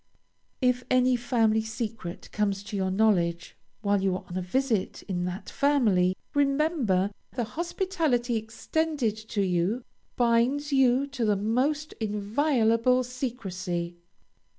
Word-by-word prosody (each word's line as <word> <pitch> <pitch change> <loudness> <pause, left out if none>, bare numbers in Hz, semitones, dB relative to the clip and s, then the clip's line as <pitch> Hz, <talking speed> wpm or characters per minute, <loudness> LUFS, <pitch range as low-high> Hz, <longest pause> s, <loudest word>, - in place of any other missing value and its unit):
If 250 0 +2
any 255 0 +4
family 225 -3 +2
secret 220 -5 -6
comes 200 -2 -1
to 205 - -7
your 190 -1 0
knowledge 185 -4 +1 0.3
while 200 -1 +2
you 190 -1 +1
are 185 - -5
on 175 - -8
a 185 - -1
visit 220 +2 -1
in 180 -3 -2
that 180 +3 -5
family, 215 -11 +2 0.2
remember 275 - +2 0.2
the 245 - -1
hospitality 320 - -1
extended 230 +2 -1
to 215 -1 -3
you 185 +6 0 0.3
binds 250 +5 +2
you 265 0 +4
to 275 -4 -4
the 210 -2 +2
most 265 +9 0
inviolable 230 +3 +2
secrecy. 190 -9 -4
225 Hz, 125 wpm, -27 LUFS, 195-260 Hz, 0.3 s, any